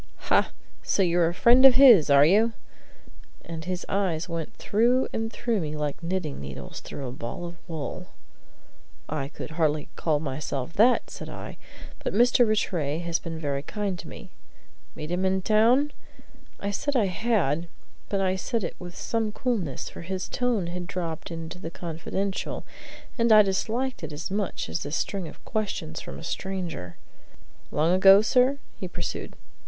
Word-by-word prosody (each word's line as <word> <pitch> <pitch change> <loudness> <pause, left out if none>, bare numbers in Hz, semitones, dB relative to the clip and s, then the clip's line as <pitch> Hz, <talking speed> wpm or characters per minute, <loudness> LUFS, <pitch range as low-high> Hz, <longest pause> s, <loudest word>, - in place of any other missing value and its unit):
"Ha! - - +4 0.3
So 195 - +1
you're 175 -1 +3
a 170 - -1
friend 245 +5 +6
of 265 -2 +9
his, 240 - +8
are 140 0 +7
you?" 215 +7 +4 0.9
And 160 -1 -6
his 180 0 -3
eyes 180 -4 0
went 165 -2 -5
through 240 +5 +2
and 225 0 -2
through 235 -3 -1
me 155 -1 -3
like 150 0 -3
knitting 170 - -3
needles 70 -1 -7
through 135 - -7
a - - -5
ball 130 +7 -6
of 170 0 -8
wool. 160 -5 -5 1.0
"I 135 - -3
could 150 - -8
hardly 155 -2 0
call 155 -3 +1
myself 140 0 -4
that," 240 +4 +4
said - - -7
I. - - -8 0.5
"But - - -2
Mr. 245 +1 +5
Rattray 165 -8 0
has 170 -1 -1
been 165 -1 -6
very 140 -3 -2
kind 195 +3 -3
to - - -8
me." - - -10 0.6
"Meet 155 +2 -6
him 180 +1 0
in 190 0 +1
town?" 235 +8 +4 0.7
I 200 - -2
said 285 +8 -2
I 230 -5 +4
had, 185 - 0 0.4
but 200 - 0
I 190 -1 +1
said 230 +2 -2
it 170 - -4
with 175 -1 -9
some 225 -2 -1
coolness, 205 - -2
for - - -9
his 185 +2 -4
tone 245 -7 0
had 175 +1 -5
dropped 170 -3 -4
into 165 +1 -6
the 165 - -5
confidential, 175 +4 -4 0.5
and 230 0 +4
I 215 -1 +9
disliked 225 +5 -1
it 155 - -5
as 150 +5 -5
much 200 -2 -2
as 80 0 -3
this 145 +2 -3
string 190 -1 -2
of 150 - -13
questions 190 -7 -3
from - - -8
a - - -10
stranger. 170 - -4 0.7
"Long 160 +4 +2
ago, 195 +2 +8
sir?" 255 +4 +3 0.2
he 185 - -5
pursued. 130 - -5
180 Hz, 170 wpm, -26 LUFS, 160-215 Hz, 1.0 s, of